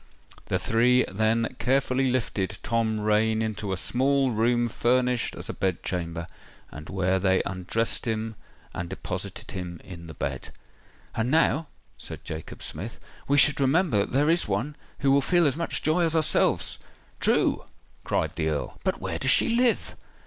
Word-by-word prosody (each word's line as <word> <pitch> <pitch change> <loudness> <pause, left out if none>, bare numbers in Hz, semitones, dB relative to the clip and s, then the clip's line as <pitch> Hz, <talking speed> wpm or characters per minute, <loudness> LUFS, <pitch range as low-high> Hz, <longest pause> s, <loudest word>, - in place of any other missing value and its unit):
The - - +1
three 125 +3 +3
then 110 +4 +1
carefully 130 0 +2
lifted 110 -6 -1
Tom 110 -1 0
Rain 110 +1 +2
into 110 -2 -3
a 95 - -1
small 135 +6 +1
room 120 +2 +2
furnished 125 +1 +1
as - - -5
a - - -4
bed 95 -2 -1
chamber, 85 -2 -3 0.5
and 75 +1 -10
where 95 0 +1
they 95 0 +2
undressed 95 +6 -2
him 110 0 -2 0.4
and 85 0 -4
deposited - - -6
him 90 -2 -6
in 85 -3 -10
the 80 - -9
bed. 65 -2 -4 0.6
"And 115 +2 -1
now," 160 +1 +3 0.3
said - - -8
Jacob 80 0 -6
Smith, - - -6 0.3
"we 140 - +3
should 145 0 +5
remember 140 - +3
that 100 - -1
there 145 +5 +3
is 170 - +2
one, 115 +9 -2 0.3
who 140 -2 +3
will 140 +1 +5
feel 175 +4 +3
as 140 -3 +2
much 170 +1 -2
joy 155 +3 +2
as 165 -2 +2
ourselves——" 160 -1 +2 0.4
"True!" - - +2 0.4
cried - - 0
the 80 -1 0
Earl. 75 -2 -3
"But - - -1
where - - -3
does - - +1
she - - +5
live?" 240 +1 +1
115 Hz, 165 wpm, -26 LUFS, 95-135 Hz, 0.6 s, should